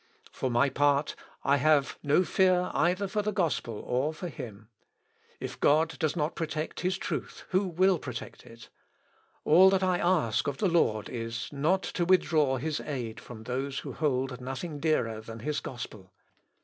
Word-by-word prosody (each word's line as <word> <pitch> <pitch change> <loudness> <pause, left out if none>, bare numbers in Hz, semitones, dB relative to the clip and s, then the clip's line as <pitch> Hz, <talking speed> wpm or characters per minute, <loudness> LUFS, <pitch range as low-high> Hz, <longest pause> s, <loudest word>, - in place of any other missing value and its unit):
For 130 - -2
my 125 +3 +3
part 145 +1 +2 0.3
I 140 +1 +3
have 145 0 +2
no 145 +5 +3
fear 180 +1 +2
either 180 +4 +1
for 210 +2 -1
the 210 +1 -1
gospel 165 - -1
or 135 +6 0
for 175 +2 -5
him. 110 -6 -9 0.7
If - - -6
God 160 +3 +3
does 155 -2 0
not 155 -1 -1
protect 155 -1 -4
his 185 +1 0
truth, - - -5
who 190 +1 +1
will 185 +1 +3
protect 125 -4 -7
it? 115 0 -14 0.8
All 180 +5 +7
that 190 0 +2
I 185 -1 +2
ask 170 -12 +1
of 140 -1 -2
the 200 - +1
Lord 110 -11 +2
is, 115 -1 -4
not 165 +7 +1
to 175 - -2
withdraw 160 -6 +3
his 155 +4 -2
aid 120 -7 -5
from 110 -3 -10
those 135 +3 -3
who - - -7
hold 130 -4 -1
nothing 145 +4 -5
dearer 115 -8 0
than 115 0 -9
his 150 +4 -1
gospel. 110 -6 -8
150 Hz, 170 wpm, -29 LUFS, 125-175 Hz, 0.8 s, All